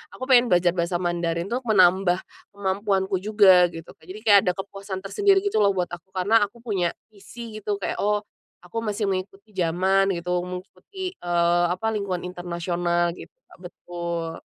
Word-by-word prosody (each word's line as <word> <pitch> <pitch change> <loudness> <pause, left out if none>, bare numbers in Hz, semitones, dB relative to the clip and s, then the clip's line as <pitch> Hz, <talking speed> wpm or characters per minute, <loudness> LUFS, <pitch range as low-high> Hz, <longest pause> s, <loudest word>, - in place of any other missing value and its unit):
aku - - -8
pengen 245 -1 +6
belajar 175 0 +4
bahasa 170 0 -1
Mandarin 170 -1 -1
tuk 250 +2 -2
menambah 185 -2 +4 0.4
kemampuanku 195 0 0
juga, 190 -3 +5
gitu 165 -1 -10
Kak. - - -28
Jadi 195 +3 -8
kayak 205 -1 +8
ada - - +5
kepuasan 195 0 -6
tersendiri 390 - +3
gitu 405 - 0
loh 200 - +4
buat 180 -1 0
aku, 175 +1 -9
karena 200 +5 +3
aku 235 +4 -20
punya 190 -7 0 0.2
visi 215 +2 -10
gitu 210 0 -2
kayak, - - -3
oh, 210 0 +1 0.4
aku 225 +6 -4
masih 210 -1 -2
mengikuti 195 +2 -4
zaman 190 +2 +2
gitu, 175 +1 -1
mengikuti, 210 - -7
eee, 175 - +1
apa 185 +5 -3
lingkungan 190 -4 -3
internasional 175 -1 -1
gitu, - - -11 0.2
Kak. - - -19
Betul. 170 -2 -6
185 Hz, 165 wpm, -24 LUFS, 175-205 Hz, 0.4 s, kayak